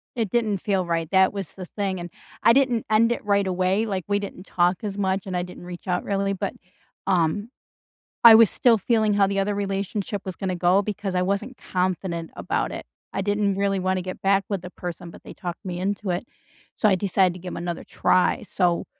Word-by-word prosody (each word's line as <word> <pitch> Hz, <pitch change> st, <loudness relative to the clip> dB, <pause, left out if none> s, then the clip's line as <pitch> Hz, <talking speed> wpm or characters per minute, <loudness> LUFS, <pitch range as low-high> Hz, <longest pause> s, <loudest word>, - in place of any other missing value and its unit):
It 225 Hz, -5 st, -1 dB
didn't 220 Hz, -3 st, +1 dB
feel 190 Hz, -2 st, 0 dB
right, 165 Hz, -2 st, -1 dB
that 190 Hz, 0 st, +4 dB
was 195 Hz, -5 st, -5 dB
the 185 Hz, -, -7 dB
thing, 190 Hz, -1 st, -3 dB
and, 175 Hz, 0 st, -6 dB, 0.3 s
I 230 Hz, -, +7 dB
didn't 250 Hz, -4 st, +2 dB
end 225 Hz, +2 st, +4 dB
it -, -, -2 dB
right 200 Hz, -1 st, +2 dB
away, 185 Hz, +4 st, +1 dB
like, 190 Hz, -4 st, -2 dB
we 200 Hz, 0 st, +1 dB
didn't 200 Hz, -2 st, -8 dB
talk 175 Hz, +1 st, +1 dB
as 205 Hz, -1 st, -4 dB
much, 190 Hz, -1 st, 0 dB
and 185 Hz, -2 st, -4 dB
I 175 Hz, -, +1 dB
didn't 180 Hz, 0 st, -10 dB
reach 175 Hz, +1 st, -9 dB
out 180 Hz, 0 st, 0 dB
really, 195 Hz, 0 st, 0 dB
but, 195 Hz, 0 st, -3 dB, 0.5 s
um, 190 Hz, +4 st, +1 dB, 0.7 s
I 230 Hz, -1 st, +11 dB
was 225 Hz, -3 st, +7 dB
still 235 Hz, -3 st, +4 dB
feeling 220 Hz, 0 st, +2 dB
how 200 Hz, -1 st, +4 dB
the 195 Hz, 0 st, -1 dB
other 200 Hz, +1 st, 0 dB
relationship 200 Hz, 0 st, -2 dB
was 185 Hz, -3 st, -5 dB
gonna 185 Hz, -2 st, -2 dB
go 180 Hz, +3 st, +3 dB
because 200 Hz, -1 st, -4 dB
I 180 Hz, -, +2 dB
wasn't 200 Hz, +7 st, -2 dB
confident 180 Hz, -2 st, -2 dB
about 90 Hz, -, -2 dB
it. -, -, -6 dB, 0.3 s
I -, -, -1 dB
didn't 205 Hz, 0 st, +1 dB
really 195 Hz, -1 st, 0 dB
wanna 185 Hz, 0 st, 0 dB
get 185 Hz, +1 st, -6 dB
back 195 Hz, 0 st, +3 dB
with 195 Hz, -4 st, -2 dB
the 180 Hz, -, -8 dB
person, 175 Hz, -1 st, -7 dB
but -, -, -14 dB
they -, -, -10 dB
talked 175 Hz, +2 st, -6 dB
me 180 Hz, -2 st, -4 dB
into 200 Hz, +1 st, -2 dB
it. 175 Hz, +6 st, -1 dB, 0.5 s
So 215 Hz, -, +3 dB
I 195 Hz, -, +4 dB
decided 185 Hz, -1 st, +2 dB
to -, -, -9 dB
give 180 Hz, 0 st, -7 dB
'em -, -, -5 dB
another 175 Hz, 0 st, -4 dB
try, 185 Hz, -, +2 dB
so 180 Hz, -3 st, 0 dB
195 Hz, 220 wpm, -24 LUFS, 180-205 Hz, 0.7 s, I